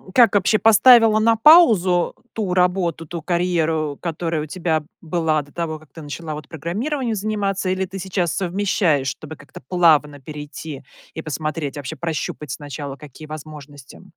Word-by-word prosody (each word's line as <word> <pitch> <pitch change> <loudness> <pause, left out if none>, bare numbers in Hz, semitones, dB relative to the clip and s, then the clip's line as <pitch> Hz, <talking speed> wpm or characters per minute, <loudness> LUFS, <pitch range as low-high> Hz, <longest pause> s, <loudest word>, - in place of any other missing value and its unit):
как 235 -5 +6
вообще 205 +2 +3
поставила 225 0 +6
на 225 +1 +4
паузу 220 - +5 0.2
ту 205 -5 -2
работу, 180 -3 +1
ту 170 +1 -6
карьеру, 165 -4 0
которая 165 -1 -2
у - - -5
тебя 160 -1 -1 0.2
была 160 -2 0
до 145 0 -16
того, 160 -2 -4
как 155 -2 -20
ты 160 - -11
начала 155 +2 -6
вот 150 0 -8
программированием 225 - -3
заниматься 200 -2 -2
или 190 0 0
ты 190 +1 -8
сейчас 180 -2 -1
совмещаешь, 180 -6 0
чтобы 155 +3 -6
как-то 140 - -14
плавно 150 -4 +3
перейти 150 0 -8 0.3
и 160 - -5
посмотреть, 155 -1 -4
вообще 140 -3 -6
прощупать 155 -3 -4
сначала, 145 0 -6
какие 150 +1 -12
возможности? 150 -3 -11
165 Hz, 155 wpm, -21 LUFS, 150-190 Hz, 0.3 s, как